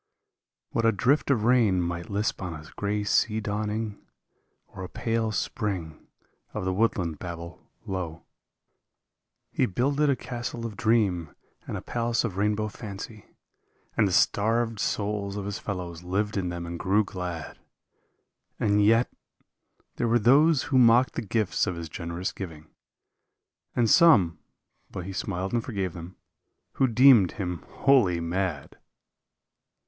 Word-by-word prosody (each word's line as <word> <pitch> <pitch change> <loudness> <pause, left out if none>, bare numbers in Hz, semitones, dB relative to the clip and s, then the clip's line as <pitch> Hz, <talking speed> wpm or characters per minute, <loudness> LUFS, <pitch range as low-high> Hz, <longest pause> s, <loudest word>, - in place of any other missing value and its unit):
What 115 - 0
a 115 - +5
drift 130 +9 +1
of 125 -6 +2
rain 115 -6 +4
might 85 0 -3
lisp 105 0 -1
on 90 -3 -4
a 80 - -9
gray 105 0 -1
sea 110 +2 +2
dawn 105 0 -2
ing. 105 -1 -4 0.7
Or 95 - -8
a 90 - -6
pale 115 -1 -1
spring 95 -6 -3 0.5
of - - -3
the 95 - 0
woodland 90 -6 0
babble 85 -1 -8 0.2
low. 90 -4 -5 1.3
148 - - -16
He - - +5
builded 140 +9 +1
a 140 - +3
castle 120 -2 -5
of 110 -3 -5
dream 100 -8 +1 0.3
and - - -3
a - - -8
palace 120 -1 -1
of 110 -6 -3
rainbow 105 +1 +1
fancy, 105 0 -8 0.7
And 105 - +3
the - - -2
starved 115 +4 +2
souls 100 -1 -2
of 100 - -4
his 100 -1 -4
fellows 90 -4 -5
lived 100 +4 -1
in 95 -3 -1
them 85 0 -5
and 85 0 -6
grew 100 +3 +2
glad; 90 -4 -6 0.5
— - - -49
And 105 -1 +3
yet 115 +3 +4 0.5
— - - -44
there 120 - 0
were 115 +1 +4
those 140 +6 +5
who 135 -3 +2
mocked 120 +1 +5
the - - -3
gifts 110 -1 0
of 90 - -2
his 85 -1 -6
generous 85 +3 -4
giving, 80 -5 -8 1.1
And 120 - +3
some 105 - +5 0.3
— - - -45
but 90 -2 -6
he 95 - -6
smiled 95 +1 -3
and 120 -2 +1
forgave 95 -8 -3
them 85 +1 -9 0.3
— - - -52
who 135 - +4
deemed 120 -5 +6
him 90 -6 -4
wholly 120 -11 +3
mad! 85 -3 -3
100 Hz, 155 wpm, -27 LUFS, 90-115 Hz, 1.3 s, deemed